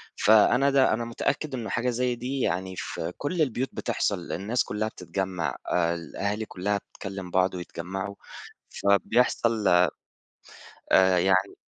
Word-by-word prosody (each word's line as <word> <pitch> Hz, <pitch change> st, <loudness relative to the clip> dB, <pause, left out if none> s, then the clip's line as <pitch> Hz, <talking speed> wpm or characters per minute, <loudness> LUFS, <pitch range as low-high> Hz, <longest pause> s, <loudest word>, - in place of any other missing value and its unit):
فأنا 110 Hz, +6 st, +5 dB
ده 135 Hz, -3 st, +4 dB
أنا 115 Hz, +1 st, -1 dB
متأكِّد 130 Hz, +4 st, -2 dB
إنه 115 Hz, -4 st, -5 dB
حاجة 120 Hz, +5 st, 0 dB
زي 125 Hz, 0 st, 0 dB
دي، 130 Hz, +3 st, -4 dB
يعني 95 Hz, -1 st, -1 dB
في 80 Hz, +1 st, -4 dB
كل 165 Hz, +4 st, -2 dB
البيوت 130 Hz, -2 st, 0 dB
بتحصل، 85 Hz, -, -2 dB
الناس 110 Hz, +7 st, 0 dB
كلَّها 105 Hz, +1 st, -2 dB
بتتجمَّع، 90 Hz, -, -3 dB, 0.2 s
الأهالي 90 Hz, +5 st, -1 dB
كلَّها 100 Hz, +1 st, -2 dB
بتكلِّم 95 Hz, -2 st, -8 dB
بعض 95 Hz, +1 st, +2 dB
ويتجمَّعوا. 95 Hz, +3 st, -5 dB, 0.5 s
فبيحصل 110 Hz, +2 st, +2 dB, 1.0 s
آآ 95 Hz, -1 st, +3 dB
يعني 95 Hz, +2 st, +2 dB
100 Hz, 125 wpm, -26 LUFS, 95-120 Hz, 1.0 s, فأنا